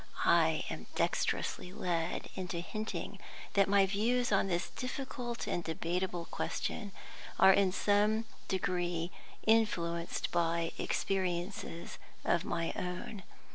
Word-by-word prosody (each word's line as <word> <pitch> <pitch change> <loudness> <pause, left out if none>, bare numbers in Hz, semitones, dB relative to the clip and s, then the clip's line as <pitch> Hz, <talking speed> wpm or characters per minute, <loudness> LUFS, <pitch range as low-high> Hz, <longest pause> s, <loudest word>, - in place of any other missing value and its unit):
I - - +4
am - - -6
dexterously 180 - 0
led 175 -2 -1
into 180 -2 -3
hinting 215 +5 -4 0.3
that 195 -1 +4
my 200 -1 +6
views 230 +5 +1
on 195 -1 +4
this 175 -1 -1
difficult 255 -2 -4
and 175 - -1
debatable 170 +2 -1
question 205 +3 -3 0.5
are 190 - +8
in 195 -1 +4
some 210 +3 +3 0.2
degree 175 -2 0 0.3
influenced 175 -7 +2
by 170 -1 +1
experiences 180 -2 -2 0.3
of 170 - +3
my 165 -1 -1
own. 180 +3 -4
185 Hz, 110 wpm, -33 LUFS, 170-210 Hz, 0.5 s, are